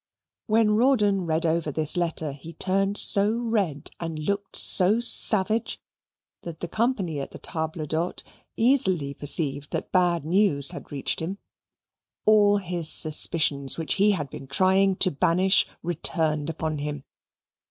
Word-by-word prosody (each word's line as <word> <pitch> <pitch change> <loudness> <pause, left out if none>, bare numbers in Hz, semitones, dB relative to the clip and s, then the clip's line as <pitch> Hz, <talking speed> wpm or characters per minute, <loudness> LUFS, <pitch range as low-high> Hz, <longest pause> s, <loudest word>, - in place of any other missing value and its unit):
When 220 -1 +2
Rawdon 210 -6 +1
read 160 +1 -1
over 160 -1 -1
this 155 +3 -1
letter, 165 -3 -3
he 145 +4 -12
turned 195 +3 -1
so 205 +2 +4
red 215 -11 -3
and 165 -2 -6
looked 200 +6 -4
so 195 +5 +4
savage 220 -2 +4 0.6
that 165 -2 -9
the 175 - -5
company 205 - -2
at 135 - -6
the - - -11
table 160 -1 -5
d'hote 160 +4 -4 0.3
easily 190 - +1
perceived 145 -1 +1
that - - -5
bad 175 -4 0
news 170 -5 +2
had - - -11
reached 140 -2 -3
him. 180 +5 -5 0.9
All 205 -1 +4
his 175 -4 -1
suspicions, 150 -3 +1
which 160 -4 -2
he 205 0 +4
had 145 -7 -5
been 135 - -10
trying 190 +6 +2
to 185 0 +1
banish, 180 +7 +2 0.2
returned 160 -2 -1
upon 160 -1 -4
him. 145 -1 -6
170 Hz, 140 wpm, -24 LUFS, 155-200 Hz, 0.9 s, so